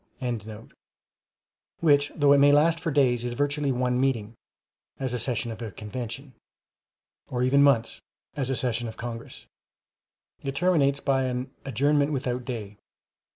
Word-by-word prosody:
] 125 Hz, -2 st, -3 dB, 1.5 s
which, 145 Hz, -3 st, +3 dB
though 145 Hz, -2 st, +5 dB
it 140 Hz, -, +5 dB
may 145 Hz, +1 st, +6 dB
last 160 Hz, +3 st, +4 dB
for 165 Hz, -, -2 dB
days, 130 Hz, -5 st, +2 dB
is 120 Hz, -1 st, -3 dB
virtually 145 Hz, +1 st, 0 dB
one 125 Hz, 0 st, 0 dB
meeting, 115 Hz, -5 st, 0 dB, 0.7 s
as 130 Hz, -2 st, -2 dB
a 125 Hz, -, -1 dB
session 120 Hz, 0 st, -2 dB
of 110 Hz, -, -8 dB
a 115 Hz, -, -4 dB
Convention; 120 Hz, +6 st, -7 dB, 0.9 s
or 125 Hz, 0 st, -2 dB
even 135 Hz, +2 st, +4 dB
months, 135 Hz, -6 st, +3 dB, 0.3 s
as 135 Hz, -3 st, -2 dB
a 135 Hz, -, 0 dB
session 120 Hz, -1 st, -1 dB
of 110 Hz, -, -8 dB
Congress; 115 Hz, 0 st, -7 dB, 1.0 s
it 135 Hz, -1 st, -4 dB
terminates 140 Hz, -5 st, +2 dB
by 135 Hz, -1 st, +1 dB
an 125 Hz, +1 st, -3 dB, 0.2 s
"adjournment 145 Hz, +3 st, +2 dB
without 125 Hz, -3 st, -2 dB
day." 105 Hz, -5 st, -6 dB
130 Hz, 150 wpm, -26 LUFS, 120-140 Hz, 1.5 s, may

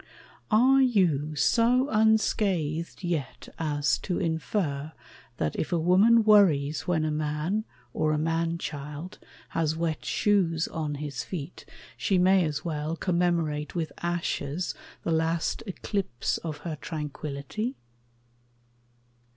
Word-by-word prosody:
Are 255 Hz, +5 st, +5 dB
you 170 Hz, -, +2 dB
so 240 Hz, -, +3 dB
unscathed 195 Hz, -7 st, +1 dB
yet 160 Hz, -7 st, -3 dB
as 145 Hz, -3 st, +1 dB
to 180 Hz, -, -2 dB
infer 160 Hz, -3 st, -2 dB, 0.4 s
That 75 Hz, -5 st, -1 dB
if -, -, -2 dB
a 175 Hz, -, +2 dB
woman 195 Hz, +8 st, +5 dB
worries 165 Hz, -9 st, +4 dB
when 160 Hz, -3 st, +1 dB
a 155 Hz, -, 0 dB
man, 155 Hz, +7 st, -1 dB, 0.3 s
Or 155 Hz, 0 st, +1 dB
a 155 Hz, -, +1 dB
man 165 Hz, +2 st, 0 dB
child, 150 Hz, +2 st, -6 dB, 0.3 s
has 160 Hz, -1 st, 0 dB
wet 165 Hz, -1 st, -2 dB
shoes 175 Hz, -6 st, +1 dB
on 155 Hz, -3 st, -3 dB
his 140 Hz, -3 st, -4 dB
feet 170 Hz, -2 st, -7 dB, 0.3 s
She 195 Hz, -, +1 dB
may 185 Hz, +1 st, +5 dB
as 150 Hz, +3 st, -3 dB
well 155 Hz, 0 st, -2 dB
commemorate 170 Hz, -5 st, 0 dB
with 165 Hz, -2 st, -2 dB
ashes 170 Hz, -1 st, -2 dB, 0.3 s
The 170 Hz, -, -1 dB
last 160 Hz, +5 st, 0 dB
eclipse 190 Hz, -, -2 dB
of 155 Hz, -3 st, -5 dB
her 160 Hz, -3 st, -3 dB
tranquillity? 155 Hz, -, -4 dB
165 Hz, 120 wpm, -27 LUFS, 150-185 Hz, 0.4 s, Are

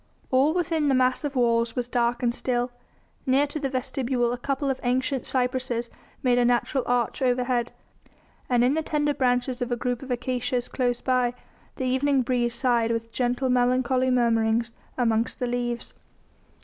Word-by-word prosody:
All 275 Hz, +5 st, +3 dB
within 325 Hz, -4 st, 0 dB
the 270 Hz, -, +3 dB
massive 255 Hz, +3 st, +1 dB
walls 235 Hz, -2 st, +2 dB
was 245 Hz, -1 st, -1 dB
dark 240 Hz, 0 st, 0 dB
and 235 Hz, -1 st, +2 dB
still; 245 Hz, -1 st, -1 dB, 0.6 s
near 270 Hz, +2 st, +4 dB
to 290 Hz, +2 st, -5 dB
the 275 Hz, -2 st, -2 dB
vestibule 255 Hz, -2 st, -1 dB
a -, -, -3 dB
couple 275 Hz, +2 st, -2 dB
of 265 Hz, -, -4 dB
ancient 260 Hz, +1 st, 0 dB
cypresses 250 Hz, -2 st, -1 dB, 0.3 s
made 245 Hz, -1 st, +3 dB
a 245 Hz, -, +3 dB
natural 245 Hz, +2 st, +1 dB
arch 245 Hz, 0 st, 0 dB
overhead, 245 Hz, -1 st, +1 dB, 0.8 s
and 245 Hz, -1 st, +3 dB
in 255 Hz, +3 st, +3 dB
the 320 Hz, -, 0 dB
tender 295 Hz, -1 st, 0 dB
branches 250 Hz, -1 st, 0 dB
of 245 Hz, 0 st, -2 dB
a -, -, +2 dB
group 245 Hz, 0 st, -2 dB
of 270 Hz, -, -9 dB
acacias 245 Hz, 0 st, -1 dB
close 245 Hz, -2 st, -1 dB
by, 250 Hz, -2 st, +1 dB, 0.4 s
the 260 Hz, -, -3 dB
evening 265 Hz, +1 st, +2 dB
breeze 240 Hz, -1 st, 0 dB
sighed 235 Hz, -2 st, +1 dB
with 230 Hz, 0 st, -2 dB
gentle, 250 Hz, +2 st, 0 dB
melancholy 255 Hz, +1 st, +2 dB
murmurings 230 Hz, -2 st, +2 dB, 0.3 s
amongst 230 Hz, -2 st, +1 dB
the 250 Hz, -, -2 dB
leaves. 240 Hz, -1 st, -3 dB
250 Hz, 165 wpm, -25 LUFS, 240-260 Hz, 0.8 s, near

